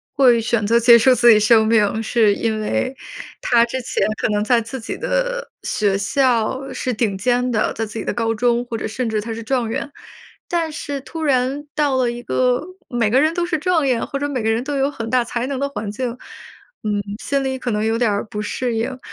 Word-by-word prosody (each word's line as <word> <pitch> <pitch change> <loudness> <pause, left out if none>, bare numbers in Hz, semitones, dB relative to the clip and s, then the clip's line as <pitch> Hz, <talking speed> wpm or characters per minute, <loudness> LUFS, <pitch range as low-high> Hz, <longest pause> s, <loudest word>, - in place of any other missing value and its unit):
会 245 -4 +5
选 225 -2 0
择 230 - +4
结 235 0 +7
束 255 +3 +5
自 240 0 +6
己 215 - +6
生 220 +1 +5
命 220 0 +2
是 220 -2 +3
因 220 0 -1
为 255 +4 -1 0.5
他 235 -1 +4
之 250 +2 -3
前 - - -1 0.2
可 - - +2
能 210 0 0
在 240 +2 +3
自 230 +2 -6
己 - - -5
的 - - -2
学 200 -2 0
校 245 +3 +1
是 255 0 -2
顶 210 -3 -1
尖 245 +4 +1
的， 220 -3 +1
在 225 - -3
自 210 - -11
己 220 - -3
的 - - -2
高 225 -1 -1
中， 240 +1 +1
或 235 -2 -4
者 - - -4
甚 235 +2 -3
至 215 -1 -1
他 225 +2 -5
是 225 - -6
状 245 -1 -1
元。 265 +5 -3 0.6
但 335 -2 0
是 285 -1 -4
突 320 +4 -7
然 270 +1 0
到 290 -3 +1
了 250 -2 +1
一 240 - -7
个 250 0 +1 0.3
每 235 -3 +1
个 255 +5 +4
人 310 +2 +2
都 350 0 -1
是 345 -2 -1
状 320 -3 +1
元， 245 -3 +1
或 275 - -4
者 290 - -1
每 260 -6 -3
个 220 - +1
人 225 +2 0
都 290 0 -3
有 275 +1 +1
很 230 -5 -6
大 250 0 +2
才 240 +1 -3
能 275 -1 -3
的 280 +1 -1
环 220 -7 -5
境， 240 +3 -3 0.7
嗯， 210 -1 0 0.2
心 280 -1 0
里 265 0 -2
可 255 -2 -3
能 210 0 0
有 225 +1 +1
点 230 -3 +2
儿 200 - -2
不 210 -1 -5
适 235 +3 -2
应。 250 +3 -3
240 Hz, 255 characters per minute, -20 LUFS, 225-265 Hz, 0.7 s, 结